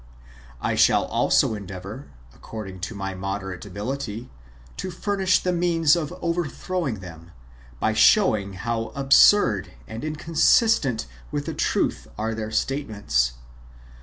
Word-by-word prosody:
I - - +1
shall - - +4
also - - +2
endeavour, 100 +5 -8 0.3
according 95 - -8
to 115 - -9
my 95 -1 -4
moderate 95 0 -5
ability, 115 +3 -5 0.5
to 185 - -4
furnish 190 +1 +1
the 180 - -1
means 170 -2 +3
of 165 -2 -3
overthrowing 170 - -2
them, 85 -2 -11 0.5
by 110 - +1
showing 110 - +4
how 115 +4 -3
absurd 135 - +5
and 110 +2 -7
inconsistent 155 - +2 0.3
with - - -2
the - - -3
truth - - -1
are 110 +1 -2
their 110 -1 -4
statements. 110 - 0
115 Hz, 120 wpm, -24 LUFS, 100-165 Hz, 0.5 s, absurd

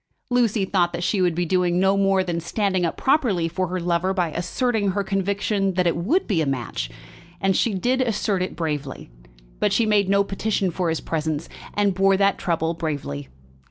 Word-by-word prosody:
Lucy 230 -5 +2
thought 175 -3 +1
that 175 0 -3
she 195 +1 +1
would 175 -3 +2
be 175 +1 0
doing 180 0 +1
no 195 +1 +3
more 195 -1 +3
than 175 -2 -2
standing 190 +1 -1
up 165 - -3
properly 240 - +2
for 185 +3 -2
her 185 +2 -3
lover 175 +2 0
by 175 -4 0
asserting 205 - 0
her 200 0 0
conviction 195 0 0
that 180 0 +2
it 170 - +2
would 260 - +1
be 185 -7 +1
a - - +1
match; 125 -5 -3 0.5
and 195 -1 +1
she 225 -4 +1
did 250 +7 +1
assert 210 -5 0
it 185 - -3
bravely; 145 - -4 0.5
but - - +2
she 230 - +2
made 205 -3 +2
no 200 0 +4
petition 195 -1 -1
for 175 0 -1
his 160 - -1
presence, 160 -1 -2 0.3
and 205 -1 +2
bore 195 +1 +3
that 200 0 +2
trouble 165 -1 0
bravely. 145 - -4
185 Hz, 195 wpm, -23 LUFS, 170-200 Hz, 0.5 s, no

